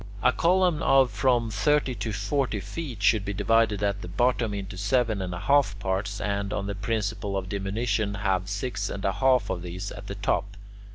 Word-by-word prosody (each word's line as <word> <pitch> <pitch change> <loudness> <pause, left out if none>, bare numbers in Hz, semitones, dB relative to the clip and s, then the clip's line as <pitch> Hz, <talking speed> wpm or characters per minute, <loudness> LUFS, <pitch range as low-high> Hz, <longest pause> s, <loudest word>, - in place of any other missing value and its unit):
A - - +5
column 180 -2 +2
of 135 -3 +4
from 115 +1 +1
thirty 130 +6 +2
to 110 0 -4
forty 105 +3 -1
feet 120 - -6
should 105 -1 +4
be 100 0 -4
divided 115 -1 +2
at 100 0 0
the - - -7
bottom 120 +4 +1
into 100 -1 -5
seven 110 +1 +1
and 90 -1 -3
a 90 - -4
half 140 -8 +3
parts, 100 +1 -2
and, 100 -1 -2
on 100 - -2
the 100 - -3
principle 105 -1 -2
of 95 -1 -4
diminution, 100 +1 -1
have 95 -2 -1
six 100 0 -3
and 100 - -5
a 95 - +3
half 130 +4 +2
of 90 - -3
these 90 +3 -6
at 100 0 -9
the 100 - -5
top. 100 0 -1
105 Hz, 195 wpm, -26 LUFS, 100-120 Hz, -, A